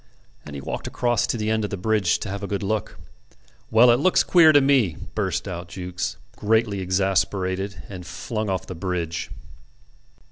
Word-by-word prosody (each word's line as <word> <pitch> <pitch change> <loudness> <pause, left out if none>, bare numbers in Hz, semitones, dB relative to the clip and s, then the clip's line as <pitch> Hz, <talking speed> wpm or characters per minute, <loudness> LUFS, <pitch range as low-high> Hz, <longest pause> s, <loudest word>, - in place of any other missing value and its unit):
And 75 - -8
he 70 - -6
walked - - -5
across 120 -1 0
to - - -1
the 110 0 -1
end 110 0 +1
of 105 - -2
the 100 - -4
bridge 105 -1 +1
to - - -4
have 100 +1 -5
a 100 - -4
good 100 0 -3
look. 105 +2 -2 0.7
"Well, 120 +2 +6
it 120 - +3
looks 185 +5 +4
queer 165 -3 +6
to 145 - +6
me," 135 - +2 0.2
burst - - -2
out 85 -2 -5
Jukes, 90 0 -4 0.2
greatly 110 -1 +1
exasperated, 95 +1 0
and 95 -3 -8
flung 110 +4 -4
off 95 -1 -2
the - - -7
bridge. 85 -2 -3
100 Hz, 180 wpm, -23 LUFS, 90-110 Hz, 0.7 s, Well